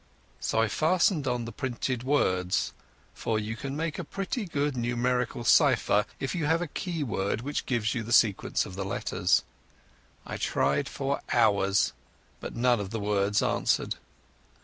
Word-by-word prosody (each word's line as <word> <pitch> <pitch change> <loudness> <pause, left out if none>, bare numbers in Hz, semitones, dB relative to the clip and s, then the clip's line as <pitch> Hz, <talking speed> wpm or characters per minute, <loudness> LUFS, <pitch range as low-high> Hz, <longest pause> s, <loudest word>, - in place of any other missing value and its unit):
So 110 - 0
I 115 - +3
fastened 160 - +2
on 125 -2 -1
the 115 - -6
printed 130 -1 -3
words, 95 -10 +1 0.4
for 110 - -1
you 110 +1 -3
can 135 +4 -5
make 165 +2 -2
a - - -2
pretty 195 - -3
good 145 -4 -1
numerical 120 0 0
cypher 120 -5 +4
if 135 - -2
you 165 -5 -1
have 165 +2 +3
a 175 - -1
key 165 0 -3
word 100 -3 -1
which 145 +4 -3
gives 115 -4 0
you 115 - -2
the 110 +2 -7
sequence 110 -5 +3
of - - -9
the 95 +1 -3
letters. 95 - +1 0.8
I - - -5
tried 70 +2 +1
for 140 0 -2
hours, 100 -4 +3 0.5
but - - -7
none 120 -1 +3
of 100 -2 -4
the 115 +2 -3
words 105 0 +1
answered. - - +1
120 Hz, 165 wpm, -28 LUFS, 105-145 Hz, 0.8 s, cypher